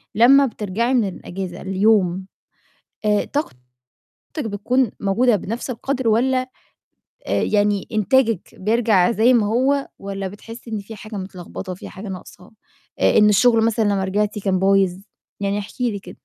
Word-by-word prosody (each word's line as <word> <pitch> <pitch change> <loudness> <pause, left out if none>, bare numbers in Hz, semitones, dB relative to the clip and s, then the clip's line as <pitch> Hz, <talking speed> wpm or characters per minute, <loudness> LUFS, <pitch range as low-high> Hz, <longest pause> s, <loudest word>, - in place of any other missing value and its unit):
لمّا 270 +5 +6
بترجَعي 225 +2 -2
من 225 -5 +2
الأجازة 180 -1 -7
اليوم 190 -1 +2 0.8
آآ، 210 -1 +2
طاقتِك 290 - -3 0.8
بتكون 225 +2 0
موجودة 220 +4 +3
بنَفْس 230 +7 -5
القدْر 260 +1 -2
والّا، 255 +3 +1 0.8
آآ، - - 0
يعني 205 -1 +1
إنتاجِك 225 -1 +2
بيرجّع 215 -2 +2
زي 230 +3 +4
ما 215 -3 +3
هو 265 +5 +1
والّا 195 -1 -5
بتحسي 225 +4 -11
إن 215 - -1
فيه 210 +3 -10
حاجة 215 +1 -9
متلخبطة، 185 0 -7
فيه - - -10
حاجة 195 +2 -9
ناقصة، 185 -1 -10 0.5
إ - - +4
إن 210 - +6
الشغل 225 +2 +4
مثلًا 225 -1 +1
لمّا 200 -2 +1
رجعتِ 205 +2 -1
كان 190 -2 0
بايظ؟ 195 -1 +3 0.4
يعني 200 +1 -1
احكي 235 +4 -3
لي 200 - -4
كده. 180 -2 -12
210 Hz, 150 wpm, -21 LUFS, 195-235 Hz, 0.8 s, لمّا